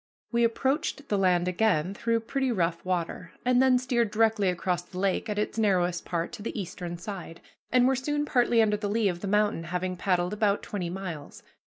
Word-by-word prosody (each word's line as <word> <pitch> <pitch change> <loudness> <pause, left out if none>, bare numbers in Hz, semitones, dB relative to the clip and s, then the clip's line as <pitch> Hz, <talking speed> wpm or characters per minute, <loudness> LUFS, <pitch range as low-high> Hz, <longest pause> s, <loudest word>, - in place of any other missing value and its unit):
We 235 0 +2
approached 275 +4 0
the 205 - +2
land 180 -2 +3
again 180 -2 +1
through 230 +2 0
pretty 265 +3 -1
rough 170 -5 0
water, 180 -1 -3
and 250 0 +4
then 260 -1 +5
steered 245 -3 +1
directly 220 -2 +2
across 180 0 -1
the 180 +1 -12
lake 195 +3 0
at 210 - -2
its 210 +2 -1
narrowest 180 -5 +1
part 170 -1 -2
to 235 - -8
the 215 - -4
eastern 175 -2 -5
side, 175 -3 -7 0.3
and 250 0 +5
were 265 - +3
soon 295 +3 -1
partly 240 -4 +3
under 210 -1 +1
the 205 -1 -3
lee 215 -1 +2
of 175 -1 -4
the 200 - -5
mountain, 205 -4 +1
having 180 +2 -2
paddled 180 0 0
about 205 -1 +1
twenty 180 -4 -4
miles. 175 -5 -7
205 Hz, 200 wpm, -27 LUFS, 180-230 Hz, 0.3 s, then